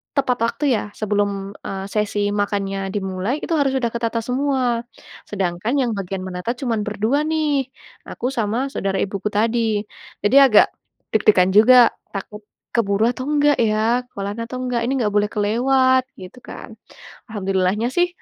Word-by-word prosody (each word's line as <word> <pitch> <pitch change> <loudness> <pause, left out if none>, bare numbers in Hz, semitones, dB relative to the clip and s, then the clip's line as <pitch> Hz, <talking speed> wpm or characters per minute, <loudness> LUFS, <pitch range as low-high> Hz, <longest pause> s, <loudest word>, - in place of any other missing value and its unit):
tepat 260 -3 +1
waktu 260 - -3
ya, - - -2 0.2
sebelum, 205 -2 -1 0.2
eee, 195 0 -4
sesi 205 -1 -1
makannya 195 -1 -2
dimulai, 190 +4 -2
itu 335 - -2
harus 275 -2 +2
sudah 250 -3 0
ketata 230 0 -1
semua. 250 -1 0 0.5
Sedangkan 190 +3 -2
yang 245 -2 0
bagian 195 0 -4
menata 180 +4 -3
cuman 230 -4 -1
berdua 220 +8 0
nih, 305 -4 0 0.4
aku 245 - -3
sama 235 +1 -1
saudara 195 0 -1
ibuku 200 +1 -3
tadi. 225 0 +1 0.4
Jadi 205 +6 +2
agak 265 -6 +6 0.5
deg-degan 200 -4 +4
juga, 240 +2 +7 0.2
takut 210 +1 -7 0.3
keburu 200 -2 +1
atau 255 +1 -6
nggak 295 -1 +3
ya? 225 +3 +1
Kelar 200 +2 -5
atau 250 +2 -7
nggak? 245 -2 -1
Ini 260 - 0
nggak 210 - +1
boleh 205 0 +4
kelewat, 260 +5 +2 0.2
gitu 185 +7 -11
kan. - - -10 0.6
Alhamdulillahnya 195 +1 0
sih 350 +3 +3
220 Hz, 150 wpm, -21 LUFS, 200-250 Hz, 0.6 s, juga